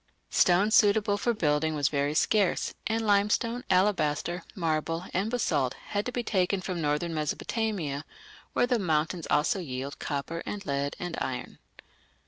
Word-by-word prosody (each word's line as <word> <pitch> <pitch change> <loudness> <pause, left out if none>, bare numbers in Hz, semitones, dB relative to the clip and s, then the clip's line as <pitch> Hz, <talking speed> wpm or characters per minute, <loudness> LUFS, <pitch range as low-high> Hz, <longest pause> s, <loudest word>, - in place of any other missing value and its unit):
Stone, 185 +4 +4
suitable 210 -1 +4
for 220 +4 0
building, 155 -6 +1
was 145 -3 +2
very 145 0 0
scarce, 200 +2 +2
and 225 0 0
limestone, 215 +4 +2
alabaster, 180 -3 +1
marble, 165 0 -1
and 195 +4 0
basalt 150 - 0 0.2
had 205 +2 0
to - - -2
be 245 -1 -2
taken 190 -2 +1
from 185 -2 -4
northern 150 +3 0
Mesopotamia, 155 -1 -2 0.5
where - - +3
the 245 -1 +1
mountains 160 -1 0
also 150 +6 +2
yield 135 -4 -5
copper 155 +3 -3
and 205 -1 -5
lead 140 0 -1
and 175 -2 -4
iron. 125 -1 -4
175 Hz, 145 wpm, -28 LUFS, 150-205 Hz, 0.5 s, Stone